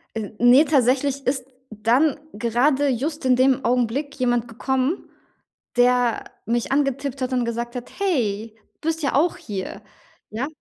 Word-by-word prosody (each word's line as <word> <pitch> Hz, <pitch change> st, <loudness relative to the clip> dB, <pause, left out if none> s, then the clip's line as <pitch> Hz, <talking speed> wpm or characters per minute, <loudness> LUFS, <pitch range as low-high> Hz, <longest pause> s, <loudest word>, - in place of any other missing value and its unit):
Äh, 220 Hz, -2 st, -3 dB
ne, 245 Hz, +5 st, +7 dB
tatsächlich 275 Hz, 0 st, +1 dB
ist 260 Hz, -1 st, 0 dB, 0.2 s
dann 235 Hz, +8 st, +2 dB, 0.2 s
gerade 250 Hz, +6 st, +1 dB
just 285 Hz, +5 st, -2 dB
in 255 Hz, -1 st, +5 dB
dem 260 Hz, +1 st, +2 dB
Augenblick 250 Hz, +4 st, 0 dB
jemand 240 Hz, -2 st, +1 dB
gekommen, 265 Hz, -, -2 dB, 0.7 s
der 245 Hz, -1 st, +3 dB, 0.2 s
mich 235 Hz, +3 st, -1 dB
angetippt 275 Hz, -1 st, 0 dB
hat 255 Hz, 0 st, -2 dB
und 250 Hz, -1 st, +1 dB
gesagt 235 Hz, +1 st, -4 dB
hat: 245 Hz, -, -7 dB
'Hey, 230 Hz, -, -1 dB, 0.3 s
du 320 Hz, -, -3 dB
bist 325 Hz, 0 st, -1 dB
ja 280 Hz, -, 0 dB
auch 320 Hz, +6 st, +2 dB
hier!' 195 Hz, -4 st, -6 dB, 0.5 s
Ja? 230 Hz, +5 st, -3 dB
255 Hz, 145 wpm, -23 LUFS, 235-280 Hz, 0.7 s, ne